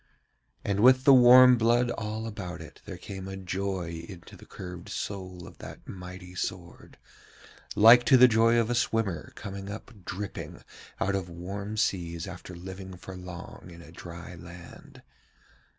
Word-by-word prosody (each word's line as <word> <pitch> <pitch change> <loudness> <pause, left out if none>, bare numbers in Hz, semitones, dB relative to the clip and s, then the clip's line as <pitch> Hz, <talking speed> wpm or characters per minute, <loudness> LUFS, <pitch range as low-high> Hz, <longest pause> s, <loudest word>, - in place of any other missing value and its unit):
And 100 0 0
with 130 +3 +6
the 140 - +7
warm 125 0 +8
blood 120 +2 +3
all 110 0 -4
about 95 -5 -6
it 80 - -12
there - - -7
came 95 -1 -8
a 95 0 -6
joy 90 -3 -4
into 85 -3 -11
the - - -15
curved 90 -2 -9
soul 95 -3 -6
of - - -14
that - - -11
mighty 90 -1 -9
sword, 90 -1 -6 0.8
like 115 +3 +8
to 135 - +6
the 125 0 +9
joy 115 0 +4
of 115 0 +1
a - - +2
swimmer 115 -8 -1
coming 100 0 -7
up 105 +4 -8
dripping 100 +3 -6 0.4
out 100 - 0
of 95 -2 -2
warm 100 +5 -6
seas 85 -5 -1
after 90 -1 -9
living 95 +1 -9
for 95 +1 -10
long 90 0 -10
in 85 0 -12
a 80 - -14
dry 85 +1 -10
land. 85 0 -13
95 Hz, 160 wpm, -28 LUFS, 90-110 Hz, 0.8 s, the